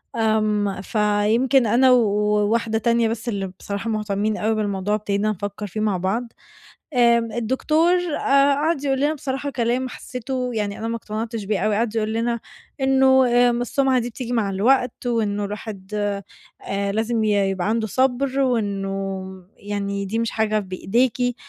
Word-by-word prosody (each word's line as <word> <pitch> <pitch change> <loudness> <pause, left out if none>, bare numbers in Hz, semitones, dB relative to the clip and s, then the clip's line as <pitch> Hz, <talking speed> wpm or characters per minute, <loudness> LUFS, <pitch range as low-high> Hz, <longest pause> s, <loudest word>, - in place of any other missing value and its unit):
آمم، 215 -3 +1
فيمكن 220 +5 +2
أنا 255 +4 +5
وواحدة 210 0 +2
تانية 235 +1 +2
بس 230 +2 -3
اللي 200 -3 -2
بصراحة 200 +3 -4
مهتمين 210 -1 -1
أوي 220 +1 0
بالموضوع 205 -1 -1
ابتدينا 205 0 -1
نفكَّر 205 +1 -5
فيه 210 +3 -6
مع 210 -3 +1
بعض. 220 +7 -2 0.6
آمم، 235 -2 +3
الدكتور 285 +9 +1 0.2
آآ، 275 +1 +4
قعد 295 0 0
يقول 270 -1 +1
لنا 295 +2 +2
بصراحة 285 -1 -4
كلام 250 +1 -1
حسِّيته 250 +1 -4
يعني 205 -2 -2
أنا 225 - -3
ما 230 - -2
اقتنعتش 225 0 -4
بيه 200 0 -1
أوي، 210 +2 +1
قعد 225 +1 -1
يقول 220 -1 0
لنا 235 +1 -1 0.4
إنُّه 265 -1 +4
آآ، 245 0 +4
السُّمعة 255 +2 +1
دي 240 0 -3
بتيجي 245 +1 -5
مع 220 -4 +1
الوقت، 245 +5 +1
وإنُّه 210 -4 0
الواحد 205 -1 -7 0.7
آآ، 200 0 -2
لازم 220 +2 0
ي 215 - +2 0.2
يبقى 190 +1 -2
عنده 220 0 0
صبر، 260 +3 +1
وإنُّه 195 -6 -1 0.3
يعني 200 -1 -3
دي 220 +4 -2
مش 230 0 -1
حاجة 215 -1 +1
بإيديكِ، 235 +6 0
225 Hz, 155 wpm, -22 LUFS, 205-245 Hz, 0.7 s, أنا